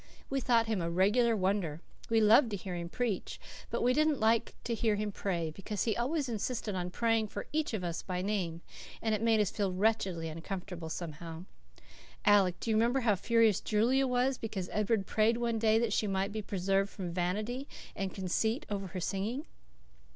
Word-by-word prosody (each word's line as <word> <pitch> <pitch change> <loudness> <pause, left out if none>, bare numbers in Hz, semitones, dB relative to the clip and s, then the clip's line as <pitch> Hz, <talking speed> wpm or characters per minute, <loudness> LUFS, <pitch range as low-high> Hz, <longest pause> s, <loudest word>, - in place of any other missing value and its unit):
We 270 0 0
thought 235 -2 +3
him 220 -4 -1
a 170 - -1
regular 210 +7 +3
wonder. 185 -5 0 0.3
We 225 -1 +4
loved 225 +4 +6
to 205 - -3
hear 185 0 -6
him 170 -1 -4
preach, 235 -2 -2 0.3
but - - -1
we 250 +1 +4
didn't 305 0 +2
like 225 +1 +2
to 235 - -2
hear 225 -1 +1
him 210 0 -2
pray, 170 -5 -2
because 195 +5 -3
he 220 -3 0
always 275 +4 0
insisted 225 -1 -2
on 180 -1 -2
praying 225 +3 +1
for 205 - -6
each 305 -6 0
of 190 - -4
us 170 -1 -3
by 180 -1 -3
name, 185 -5 -2 0.4
and 220 -1 0
it 215 - 0
made 225 -1 +3
us 210 -3 +2
feel 200 -3 -1
wretchedly 190 -4 0
uncomfortable, 170 +1 -6
somehow. 165 +1 -6 0.8
Alec, 195 -4 +4
do 230 - -2
you - - +3
remember 240 +4 +2
how 225 -4 +3
furious 225 0 +3
Julia 245 +6 +2
was 250 +1 +1
because 200 -5 -4
Edward 210 -1 +1
prayed 220 +4 +2
one 235 -1 0
day 220 0 +4
that 225 -2 +1
she 210 - +1
might 195 +1 0
be 215 +1 -3
preserved 195 0 0
from 180 -4 -6
vanity 210 +10 -2 0.3
and 195 -2 -2
conceit 220 +6 -1
over 195 -1 -2
her 185 +1 -5
singing?" 210 - -2
210 Hz, 195 wpm, -32 LUFS, 185-230 Hz, 0.8 s, loved